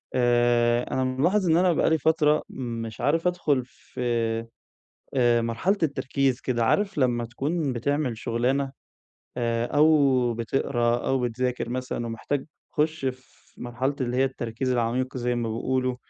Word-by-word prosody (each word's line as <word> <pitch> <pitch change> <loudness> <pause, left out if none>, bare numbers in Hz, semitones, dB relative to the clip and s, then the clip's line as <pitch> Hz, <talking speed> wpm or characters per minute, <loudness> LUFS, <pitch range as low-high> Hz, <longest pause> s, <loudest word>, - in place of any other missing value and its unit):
آآ 120 -1 +3
أنا 130 - +1
ملاحظ 170 +9 +1
إن 160 - +5
أنا 180 -1 +4
بقى - - +2
لي 160 - +3
فترة 155 0 +2
مش 115 -3 -5
عارف 165 +4 +2
أدخل 150 -7 +1
في 125 - -11 1.1
آآ 120 -2 +3
مرحلة 120 - 0
التركيز 135 -3 0
كده، 120 -2 0
عارف 200 - +1
لما 120 -3 +2
تكون 140 +4 -2
بتعمل 125 0 -1
شغلانة، 130 +4 0 0.7
آآ 115 -1 0
أو 140 -5 +3
بتقرا 120 0 0
أو 135 -1 +1
بتذاكر 125 0 -2
مثلًا، 125 -1 -3
ومحتاج 125 +5 -3 0.3
تخُش 155 -1 0
في 130 0 -8
مرحلة 125 +3 -2
اللي 125 -1 -1
هي 135 - +4
التركيز 130 -1 -3
العميق 125 +2 -1
زي 125 0 0
ما 120 -1 -2
بيقولوا 130 +2 -1
130 Hz, 140 wpm, -25 LUFS, 120-145 Hz, 1.1 s, إن